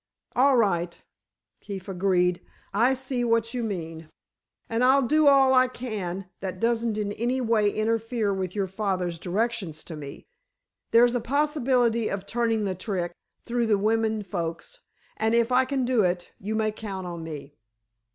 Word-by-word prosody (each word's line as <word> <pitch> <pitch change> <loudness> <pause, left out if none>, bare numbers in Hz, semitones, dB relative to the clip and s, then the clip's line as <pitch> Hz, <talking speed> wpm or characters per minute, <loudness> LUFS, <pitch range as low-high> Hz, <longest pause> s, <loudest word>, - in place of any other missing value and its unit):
"All 265 +1 +5
right," 175 -6 +1 0.6
Keefe 195 -2 -7
agreed. 180 -2 +1 0.3
"I 240 +6 +3
see 255 -1 -2
what 230 0 +1
you 250 - -2
mean, 165 -6 -5 0.6
and 230 +2 0
I'll 265 +2 +5
do 305 +4 +3
all 270 -2 +6
I 255 0 +5
can 200 -7 -5
that 185 -1 -5
doesn't 230 -1 0
in 205 -1 -1
any 240 +5 -1
way 225 -4 +2
interfere 225 0 0
with 185 -1 -3
your 200 -2 0
father's 185 -3 -2
directions 190 -4 -2
to 165 - -8
me. 140 -2 -9 0.6
There's 240 +1 +5
a 245 - 0
possibility 255 -4 +1
of 195 0 -4
turning 225 -1 0
the 190 - -1
trick 180 -2 -3 0.3
through 240 -1 0
the 210 -2 +3
women 220 +1 +1
folks, 175 - -5 0.4
and 220 +1 +1
if 235 +1 +2
I 255 +1 +4
can 265 -1 -1
do 245 -2 +3
it, 175 -2 -1
you 210 +3 -3
may 215 0 +1
count 200 -3 -6
on 170 -2 -6
me." 150 -3 -8
220 Hz, 160 wpm, -26 LUFS, 185-240 Hz, 0.6 s, all